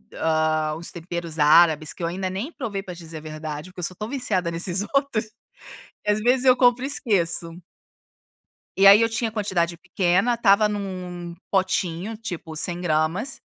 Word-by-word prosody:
ah, 155 Hz, -1 st, 0 dB
uns 170 Hz, -, -7 dB
temperos 170 Hz, -2 st, -6 dB
árabes 155 Hz, 0 st, +5 dB
que 170 Hz, -, -8 dB
eu -, -, +1 dB
ainda 185 Hz, +2 st, -3 dB
nem 205 Hz, -, -4 dB
provei 205 Hz, -10 st, -5 dB
pra 180 Hz, -, -7 dB
dizer 165 Hz, -2 st, -10 dB
a -, -, -6 dB
verdade, 155 Hz, +1 st, -7 dB
porque 180 Hz, -, -13 dB
eu -, -, -5 dB
só 185 Hz, -, -1 dB
estou 210 Hz, +4 st, -6 dB
viciada 200 Hz, -10 st, -1 dB
nesses 175 Hz, +3 st, 0 dB
outros, 275 Hz, -6 st, +1 dB, 0.8 s
que 210 Hz, -, +2 dB
às 210 Hz, -, 0 dB
vezes 250 Hz, +3 st, +2 dB
eu 255 Hz, -1 st, +7 dB
compro 245 Hz, 0 st, +4 dB
e -, -, -1 dB
esqueço. 175 Hz, -, -1 dB, 1.2 s
E 195 Hz, 0 st, +7 dB
aí 200 Hz, +3 st, +9 dB
eu 230 Hz, -, +3 dB
tinha 225 Hz, 0 st, -2 dB
quantidade 175 Hz, -6 st, -1 dB
pequena, 185 Hz, +5 st, +1 dB
estava 210 Hz, -2 st, +4 dB
num 205 Hz, -1 st, -3 dB, 0.3 s
num 175 Hz, -1 st, -8 dB, 0.2 s
potinho, 185 Hz, +1 st, -1 dB
tipo, 175 Hz, -7 st, -7 dB
100 175 Hz, +3 st, -2 dB
gramas, 170 Hz, -, -1 dB
185 Hz, 175 wpm, -23 LUFS, 165-215 Hz, 1.2 s, aí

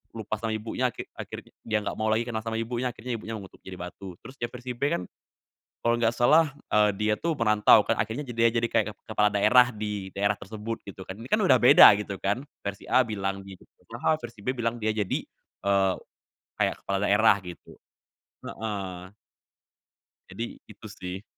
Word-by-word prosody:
lupa 110 Hz, -1 st, -3 dB
sama 115 Hz, 0 st, -2 dB
ibunya, 120 Hz, +3 st, -1 dB
akhir -, -, -8 dB
akhirnya -, -, -8 dB
dia 110 Hz, -1 st, 0 dB
gak -, -, -3 dB
mau 110 Hz, -, 0 dB
lagi 110 Hz, +2 st, +2 dB
kenal 110 Hz, -2 st, -3 dB
sama 115 Hz, 0 st, -3 dB
ibunya, 120 Hz, +2 st, -2 dB
akhirnya 120 Hz, +1 st, -5 dB
ibunya 115 Hz, 0 st, -6 dB
mengutuk 95 Hz, -, -13 dB
jadi 95 Hz, -, -8 dB
batu. 90 Hz, +1 st, -8 dB
Terus 130 Hz, -, -11 dB
di 120 Hz, -, -1 dB
versi 125 Hz, 0 st, -6 dB
B 120 Hz, -, -24 dB
kan, 90 Hz, -, -1 dB, 0.8 s
kalo 120 Hz, -, +3 dB
gak 115 Hz, -1 st, +3 dB
salah, 150 Hz, +5 st, +4 dB, 0.2 s
eee, 105 Hz, 0 st, +5 dB
dia 105 Hz, +1 st, +1 dB
tuh 165 Hz, -1 st, 0 dB
merantau 105 Hz, -2 st, +5 dB
kan -, -, +2 dB
akhirnya 125 Hz, +7 st, -2 dB
ja 120 Hz, -, -6 dB
dia 115 Hz, 0 st, +5 dB
jadi 115 Hz, 0 st, +1 dB
kayak 110 Hz, -2 st, +2 dB
ke -, -, -27 dB, 0.2 s
kepala 105 Hz, 0 st, +4 dB
daerah 120 Hz, +5 st, +5 dB
di 105 Hz, -2 st, -4 dB
daerah 100 Hz, +1 st, +2 dB
tersebut 110 Hz, +2 st, -6 dB
gitu 95 Hz, -1 st, -8 dB
kan, 95 Hz, -, -5 dB
ini 120 Hz, +3 st, -9 dB
kan 215 Hz, -, +3 dB
udah 135 Hz, -9 st, +6 dB
beda 120 Hz, -, +9 dB
gitu 100 Hz, -1 st, -6 dB
kan, 105 Hz, +7 st, 0 dB, 0.2 s
versi 100 Hz, 0 st, -4 dB
A 130 Hz, -, +6 dB
bilang 100 Hz, -2 st, -3 dB
gitu, 95 Hz, -1 st, -12 dB, 0.3 s
padahal 155 Hz, -, 0 dB
versi 115 Hz, -3 st, -9 dB
B 130 Hz, -, +1 dB
bilang 115 Hz, 0 st, -1 dB
dia 110 Hz, -, +1 dB
jadi, 105 Hz, -3 st, -1 dB, 0.4 s
eee, 100 Hz, -1 st, +3 dB, 0.7 s
kayak -, -, 0 dB
kepala 100 Hz, 0 st, -1 dB
daerah 105 Hz, +1 st, +5 dB
gitu. 90 Hz, -1 st, -11 dB, 0.7 s
Heeh. 95 Hz, -4 st, -5 dB, 1.2 s
Jadi, -, -, -6 dB
itu -, -, -14 dB
sih. 90 Hz, +2 st, -7 dB
110 Hz, 190 wpm, -27 LUFS, 100-120 Hz, 1.2 s, beda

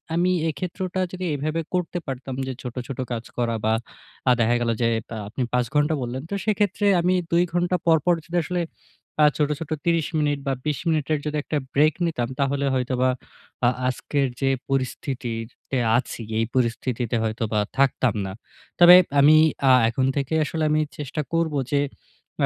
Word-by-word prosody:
আমি 180 Hz, +2 st, +2 dB, 0.2 s
এক্ষেত্রটা 185 Hz, +4 st, -4 dB
যদি 185 Hz, 0 st, -5 dB
এভাবে 155 Hz, +4 st, -2 dB
করতে 180 Hz, 0 st, -1 dB
পারতাম 130 Hz, 0 st, -5 dB
যে, -, -, -2 dB
ছোট, 125 Hz, -2 st, -7 dB
ছোট 135 Hz, -2 st, -6 dB
কাজ 115 Hz, -1 st, -3 dB
করা 115 Hz, -1 st, 0 dB
বা 110 Hz, -, +3 dB, 0.6 s
আ -, -, +7 dB
দেখা 120 Hz, +1 st, +3 dB
গেল 120 Hz, -, 0 dB
যে 115 Hz, -, +3 dB, 0.3 s
আ -, -, -5 dB
আপনি 110 Hz, +5 st, -5 dB
৫ 125 Hz, -1 st, +2 dB
ঘন্টা 150 Hz, +2 st, +3 dB
বললেন। 125 Hz, +2 st, -4 dB
তো -, -, -5 dB
সেক্ষেত্রে 205 Hz, -1 st, +1 dB, 0.2 s
আমি 180 Hz, +2 st, +2 dB, 0.2 s
২ 170 Hz, +1 st, +4 dB
ঘন্টা 175 Hz, +1 st, +1 dB
পর, 165 Hz, -1 st, +5 dB
পর 175 Hz, -, +5 dB
যদি 175 Hz, +2 st, -2 dB
আসলে 180 Hz, -1 st, -1 dB, 0.6 s
আ -, -, +8 dB
ছোট, 150 Hz, -1 st, +1 dB
ছোট 160 Hz, -1 st, -7 dB
৩০ 165 Hz, -2 st, +2 dB
মিনিট 145 Hz, -1 st, +1 dB
বা 135 Hz, -, +2 dB
২০ 150 Hz, -3 st, -1 dB
মিনিটের 155 Hz, -1 st, +1 dB
যদি 150 Hz, 0 st, -1 dB
একটা 150 Hz, -, -2 dB, 0.2 s
ব্রেক 150 Hz, +2 st, +4 dB
নিতাম। 145 Hz, -8 st, -1 dB
তাহলে 140 Hz, 0 st, +1 dB
হয়তোবা 130 Hz, 0 st, +1 dB, 0.6 s
আ -, -, +6 dB, 0.2 s
আজকের 135 Hz, +2 st, 0 dB
যে 135 Hz, -, +2 dB, 0.2 s
পরিস্থিতিতে 130 Hz, -2 st, -3 dB, 0.2 s
আছি, 120 Hz, -1 st, -4 dB, 0.2 s
এই 115 Hz, -, +2 dB
পরিস্থিতিতে 120 Hz, -1 st, 0 dB
হয়তোবা 110 Hz, -1 st, -1 dB, 0.2 s
থাকতাম 130 Hz, -2 st, +2 dB
না। 95 Hz, -, -5 dB, 0.5 s
তবে 175 Hz, +1 st, +10 dB, 0.2 s
আমি 150 Hz, +2 st, +7 dB, 0.3 s
আ -, -, +8 dB, 0.2 s
এখন 130 Hz, +3 st, 0 dB
থেকে 140 Hz, +2 st, -2 dB
আসলে 160 Hz, +2 st, -2 dB
আমি 155 Hz, 0 st, +3 dB, 0.2 s
চেষ্টা 150 Hz, +1 st, -3 dB
করবো 160 Hz, -3 st, +1 dB
যে, 145 Hz, -, +3 dB, 0.6 s
আ -, -, +6 dB
140 Hz, 175 wpm, -24 LUFS, 125-165 Hz, 0.6 s, তবে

